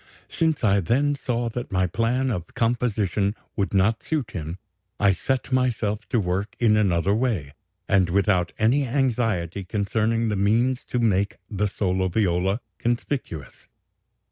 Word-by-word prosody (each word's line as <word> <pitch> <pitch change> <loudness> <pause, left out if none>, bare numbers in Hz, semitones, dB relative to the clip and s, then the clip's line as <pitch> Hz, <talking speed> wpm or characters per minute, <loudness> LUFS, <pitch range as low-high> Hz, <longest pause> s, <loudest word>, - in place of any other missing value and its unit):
"Since 160 -5 0
I 100 -2 +4
then 130 - +2
saw 120 -4 -2
that 120 +1 -5
my 95 -1 +2
plan 120 +7 0
of 90 -6 -5
composition 110 -4 0 0.2
would 100 -3 -1
not 100 +3 +2
suit 145 -8 -2
him, 80 -2 -5 0.4
I 100 -1 +5
set 130 +8 -2
myself 110 -5 0
to 120 - +2
work 95 +2 -2
in 110 -3 +4
another 95 -2 +2
way, 105 - -1 0.3
and 95 -3 +3
without 95 -1 +2
any 130 +6 +2
anxiety 115 - 0
concerning 110 +4 0
the 105 - 0
means 115 +6 +2
to - - -3
make 100 -4 +1
the 105 0 0
solo 95 -2 0
viola 95 +2 +1 0.2
conspicuous. 120 - -3
105 Hz, 140 wpm, -24 LUFS, 95-120 Hz, 0.4 s, I